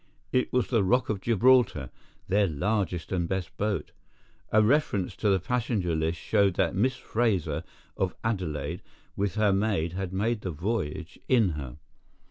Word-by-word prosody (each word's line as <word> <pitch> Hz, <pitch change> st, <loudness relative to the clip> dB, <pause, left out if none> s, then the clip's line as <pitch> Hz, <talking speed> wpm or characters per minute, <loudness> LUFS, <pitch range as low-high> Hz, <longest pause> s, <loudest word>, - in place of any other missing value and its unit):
It 125 Hz, -, +1 dB
was 125 Hz, -1 st, +2 dB
the 115 Hz, -5 st, +3 dB
Rock 125 Hz, +6 st, +2 dB
of 105 Hz, -3 st, -1 dB
Gibraltar, 115 Hz, -, +3 dB, 0.4 s
their 100 Hz, +1 st, +3 dB
largest 90 Hz, +1 st, -1 dB
and 85 Hz, -3 st, -1 dB
best 95 Hz, -3 st, -3 dB
boat. 105 Hz, -1 st, -1 dB, 0.6 s
A 110 Hz, 0 st, +5 dB
reference 110 Hz, -6 st, +1 dB
to 105 Hz, -, +1 dB
the 95 Hz, -1 st, +3 dB
passenger 105 Hz, -4 st, -1 dB
list 80 Hz, +1 st, 0 dB
showed 100 Hz, -4 st, +2 dB
that -, -, +1 dB
Miss 125 Hz, +7 st, +1 dB
Fraser, 115 Hz, -, -1 dB, 0.3 s
of 95 Hz, -1 st, -1 dB
Adelaide, 90 Hz, -9 st, -2 dB, 0.3 s
with 100 Hz, 0 st, -1 dB
her 105 Hz, -2 st, +3 dB
maid 95 Hz, -5 st, 0 dB
had 95 Hz, -1 st, -3 dB
made 105 Hz, +4 st, 0 dB
the 95 Hz, -, -4 dB
voyage 90 Hz, -1 st, -3 dB
in 115 Hz, -7 st, +4 dB
her. 75 Hz, -4 st, -6 dB
100 Hz, 155 wpm, -27 LUFS, 90-110 Hz, 0.6 s, A